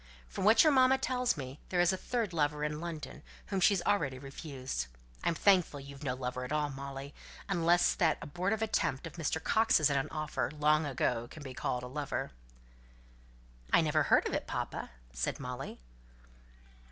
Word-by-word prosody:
From - - -4
what 220 +2 +7
your 310 -2 +5
mamma 260 0 +5
tells 250 -5 0
me, 135 0 -7
there 180 - 0
is 175 +1 +4
a - - +1
third 225 0 -2
lover 150 -2 0
in 150 +1 -2
London, 160 -5 -6 0.3
whom 195 - 0
she's 190 -1 +4
already 145 -11 +1
refused. 135 - -5 0.4
I'm 170 - +1
thankful 180 -5 +3
that - - -9
you've 140 +1 -10
no 125 -3 -1
lover 125 0 -4
at 125 - -6
all, 150 -1 0
Molly, 135 +1 -7 0.3
unless 175 -2 +3
that 160 -4 +2
abortive 185 +8 -1
attempt 190 -11 0
of 165 - -7
Mr. 160 -1 0
Coxe's 220 -10 +4
at 140 - +2
an 135 - -1
offer, 155 -1 -2
long 150 +1 +3
ago, 120 -3 0
can 155 - -10
be 130 -2 -7
called 125 0 -2
a - - -5
lover." 140 +2 -3 1.4
"I - - +6
never - - +2
heard - - +4
of - - -4
it, - - -2
papa!" - - -4 0.2
said - - -2
Molly. 125 +1 -6
150 Hz, 180 wpm, -32 LUFS, 135-180 Hz, 1.4 s, what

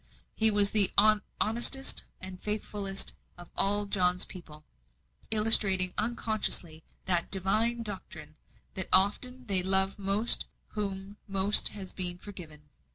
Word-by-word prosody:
He 220 0 +5
was 205 -1 +2
the 205 -3 +8 0.5
honestest 240 +5 +2
and 185 -1 -12
faithfulest 205 -2 -3 0.2
of 175 0 -16
all 205 +1 -2
John's 180 -3 -1
people 155 -4 -15 0.6
illustrating 205 -4 +3
unconsciously 210 -7 -4 0.2
that 175 -2 -1
Divine 215 +5 -2
doctrine, 160 -7 -10 0.4
that 190 - -3
often 250 +7 0
they 195 -4 +3
love 190 +1 +4
most 200 +4 +2
to - - -8 0.2
whom 200 -1 -8
most 195 +1 +2
has 195 -3 -3
been 175 -2 -1
forgiven. 155 -7 -14
195 Hz, 120 wpm, -26 LUFS, 185-210 Hz, 0.6 s, the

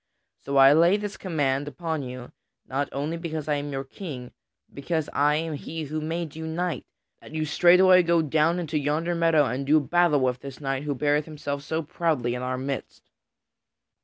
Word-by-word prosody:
So 140 0 -2
I 135 +1 +8
lay 170 +5 +5
this 205 -1 -5
command 145 -6 -1
upon 160 +1 -3
you 125 -1 -8 0.3
not 140 +1 -2
only 150 +4 -3
because 160 -3 -5
I 150 -1 +1
am 145 0 -4
your 135 0 -3
King, 135 -4 -8 0.4
but - - -32
because 160 +2 -2
I 145 +1 +3
am 160 +1 -2
he 160 +2 -5
who 155 +1 -4
made 160 0 -4
you 160 0 -5
knight 170 +1 -3 0.3
that - - -13
you 155 0 -1
straightway 180 +4 +6
go 170 -1 +2
down 155 +3 +2
into 160 -3 -2
yonder 155 +4 -1
meadow 165 -3 +3
and 130 +1 -2
do 150 +3 +4
battle 165 -1 +2
with 125 -1 0
this 135 -1 -9
knight 135 -1 -3
who 145 -1 -1
beareth 145 +2 +1
himself 145 -2 -5
so 160 +3 -3
proudly 150 -6 -1
in 125 - -4
our 130 0 -2
midst." 135 +1 -6
150 Hz, 190 wpm, -25 LUFS, 140-165 Hz, 0.4 s, I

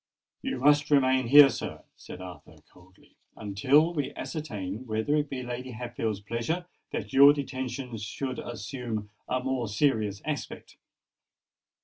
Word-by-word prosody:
"You - - -3
must 145 +3 +4
remain 130 -3 +3
here, 145 +2 +9
sir," - - -6
said 90 - -10
Arthur 90 -5 -11 0.2
coldly, 95 +1 -22 0.2
"until 130 - +3
we 145 -4 -3
ascertain 110 - -5
whether 110 +7 0
it 150 -1 0
be 130 -2 -4
Lady 125 +1 -5
Hatfield's 115 -3 -3
pleasure 115 - -3 0.3
that - - -5
your 140 +2 +9
detention 130 -3 -4
should 125 +5 -4
assume 115 -2 -5 0.2
a 130 0 0
more 130 -3 -1
serious 105 -3 +1
aspect." 150 -1 -5
125 Hz, 130 wpm, -28 LUFS, 110-140 Hz, 0.3 s, here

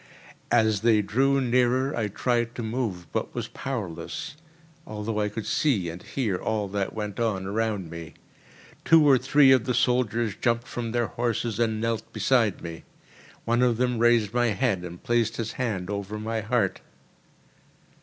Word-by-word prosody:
As 110 -4 +3
they 110 -2 +4
drew 135 +7 +2
nearer 125 +2 +2
I 110 -3 0
tried 120 +3 -1
to 120 - -4
move, 110 -6 -3
but - - -3
was - - -3
powerless, 115 - -5 0.5
although 105 0 -3
I 105 0 0
could 105 +1 -6
see 105 - +1
and 85 +2 -9
hear 110 -9 -2
all 105 +1 -2
that 100 0 -2
went 105 -1 -4
on 105 -5 0
around 105 -4 -2
me. 85 -1 -8 0.7
Two 160 -2 +6
or 135 -3 +6
three 140 0 +5
of 130 -3 +4
the 125 - 0
soldiers 120 -3 +1
jumped 120 -1 0
from 115 -2 -4
their 120 0 +1
horses 115 -1 -2
and 110 -2 +1
knelt 115 0 -2
beside 115 -7 +1
me. 85 -1 -7 0.6
One 120 +1 +2
of 120 -2 +3
them 125 -1 0
raised 115 -3 +3
my 120 0 +2
head, 105 -4 0
and 90 0 -9
placed 115 -1 +1
his 115 -1 -3
hand 105 -8 -3
over 100 +1 -4
my 110 +1 -3
heart. 105 -3 0
115 Hz, 165 wpm, -26 LUFS, 105-120 Hz, 0.7 s, Two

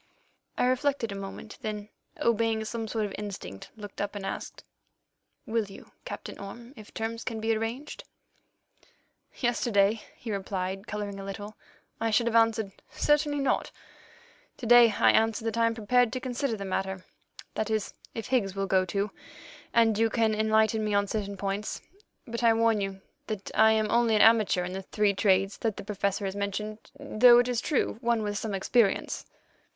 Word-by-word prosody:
I - - +2
reflected 255 -2 +1
a - - -4
moment, 195 +2 -8
then, 210 -1 -4 0.3
obeying 225 -1 +1
some 225 0 -4
sort 220 -1 -1
of 200 - -6
instinct, 185 - -7
looked 205 -2 -7
up 205 0 -3
and 200 -1 -5
asked: - - -6 0.8
"Will 225 -1 0
you, 195 - -13
Captain - - -7
Orme, 235 +6 -9
if 215 -1 -13
terms 225 +1 -4
can 225 -2 -4
be 225 +1 +1
arranged?" 230 +7 -4 1.3
"Yesterday," 225 -4 +2
he 230 - -6
replied, 195 0 -3
colouring 205 -1 -4
a - - -6
little, 205 +2 -7 0.4
"I 225 - 0
should 230 +2 +3
have 235 -1 0
answered, 225 -3 +3 0.2
'Certainly 295 -1 +1
not.' 275 - +1 0.9
To 245 - -7
day 240 0 +8
I - - +4
answer 225 0 +2
that 225 - -1
I 230 - +4
am 230 - -1
prepared 240 +2 +2
to 255 - -2
consider 250 -1 -2
the 200 - -5
matter—that 190 +3 -5
is, 215 -2 -1 0.2
if 225 +2 -5
Higgs 205 -7 +1
will 195 0 -1
go 190 -1 +2
too, 200 +3 -2 0.6
and 225 -2 +3
you 225 0 +4
can 225 -1 +2
enlighten 220 0 +2
me 210 -1 0
on 200 0 +3
certain 200 -1 -3
points. 200 +2 -3 0.5
But 235 0 -4
I 230 -1 +5
warn 225 -2 +3
you 195 -1 -4 0.3
that 210 -3 -5
I 220 0 +6
am 215 -1 +1
only 235 -1 +3
an 210 - +4
amateur 220 -5 +5
in 180 +1 -5
the 190 - -4
three 205 +1 +1
trades 195 0 +2
that 220 -3 -1
the - - -6
Professor 200 0 -1
has 190 0 -3
mentioned, 210 +2 -3 0.2
though, 240 +2 +6
it 245 0 +4
is 245 -1 0
true, 275 -6 0
one 235 -2 +1
with 205 0 -2
some 215 -3 -3
experience." 200 +1 +1
220 Hz, 175 wpm, -28 LUFS, 200-230 Hz, 1.3 s, day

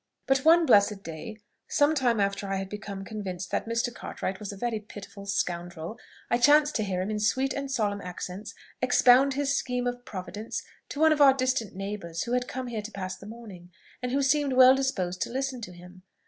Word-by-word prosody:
But 270 0 +3
one 330 +4 +5
blessed 200 -5 +4
day, 165 +7 -7 0.3
some 290 +2 +3
time 245 -6 +1
after 200 0 0
I 195 - -1
had 195 0 -4
become 200 -2 -6
convinced 190 -4 -5
that - - -1
Mr. 230 +1 -1
Cartwright 190 -4 -5
was 210 -2 -6
a 200 - -9
very 230 +1 -2
pitiful 200 -1 -11
scoundrel, 175 0 -3 0.3
I 240 - +1
chanced 295 +3 +5
to 215 - 0
hear 185 -2 -1
him 205 - -3
in 210 - -2
sweet 260 +6 +1
and 275 0 -4
solemn 210 -6 -1
accents 180 +3 -7 0.3
expound 255 +2 +5
his 280 0 +1
scheme 250 -2 -1
of 245 0 -3
providence 200 +1 -6 0.3
to 285 - -6
one 315 0 +6
of 295 - -1
our 270 -2 +8
distant 255 -7 -1
neighbours 195 -4 -4
who 245 +1 -1
came 250 +1 -5
here 235 -3 -4
to 215 +1 -8
pass 185 -2 -5
the 195 +2 -12
morning, 210 -6 -11 0.3
and 250 0 -2
who 275 +2 +1
seemed 280 0 +2
well 255 0 +8
disposed 185 -10 -2
to - - -1
listen 260 0 -3
to 195 - -7
him. 180 +1 -14
215 Hz, 205 wpm, -27 LUFS, 195-260 Hz, 0.3 s, our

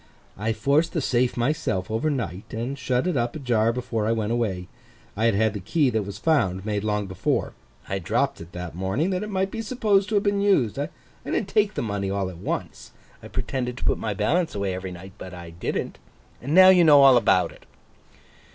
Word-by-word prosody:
'I 110 +3 -1
forced 140 +8 +1
the 165 - 0
safe 125 -3 +1
myself 120 - -1
over 115 +8 0
night, 105 - -4
and 120 +5 -3
shut 125 +1 -1
it 180 -3 0
up 120 -2 -1
ajar 120 -6 +1
before 115 -3 -2
I - - +2
went 110 -1 -1
away. 100 -7 -1 0.5
I 110 +2 0
had 115 -3 +3
had 110 0 +2
the 105 - -4
key 130 - +1
that 110 -3 -1
was 100 0 -6
found, 100 - +1
made 105 -2 -2
long 105 -1 -1
before. 95 -2 -1 0.3
I 95 - -2
dropped 85 - -1
it 85 +1 -11
that 90 -3 -6
morning, 95 - -1
that 185 0 -1
it 210 - -5
might 190 -1 -1
be 225 - -4
supposed 210 -4 +1
to 220 - -1
have 200 - +3
been 200 -1 +1
used. 140 - +2
I 145 +3 -2 0.3
didn't 195 - -2
take 210 0 +2
the - - -2
money 100 -3 -2
all 95 -1 -2
at 85 - -12
once. - - -5 0.3
I - - -10
pretended 125 -2 -3
to - - -7
put - - +1
my 105 -2 -3
balance 160 - 0
away 100 -2 -1
every 95 0 -5
night, 90 +2 -10
but 95 -1 -8
I 85 -1 -9
didn't. 85 +1 -4 0.4
Now 180 +9 +7
you 180 -2 +6
know 145 -3 +7
all 135 -2 +8
about 105 -6 +3
it. - - -18
115 Hz, 215 wpm, -24 LUFS, 100-155 Hz, 0.5 s, all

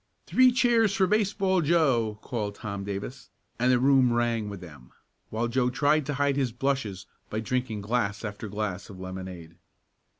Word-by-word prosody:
"Three 255 0 +5
cheers 235 -4 +3
for 195 -3 +3
Baseball 195 -2 +1
Joe!" 135 -10 +2
called 105 -5 -3
Tom 100 -3 -5
Davis, 100 +4 -6 0.3
and 125 +1 +3
the 125 - +5
room 130 -1 +4
rang 120 -2 0
with 100 -2 -7
them, 75 -8 -13 0.4
while 115 +2 -1
Joe 125 +1 +1
tried 145 +3 +2
to 145 - -2
hide 140 0 +1
his 130 -4 0
blushes 120 -6 -2 0.2
by 110 - -2
drinking 115 -1 -2
glass 110 0 -1
after 105 +1 -6
glass 100 -2 -4
of 95 -2 -10
lemonade. 95 -3 -8
120 Hz, 165 wpm, -27 LUFS, 100-140 Hz, 0.4 s, Three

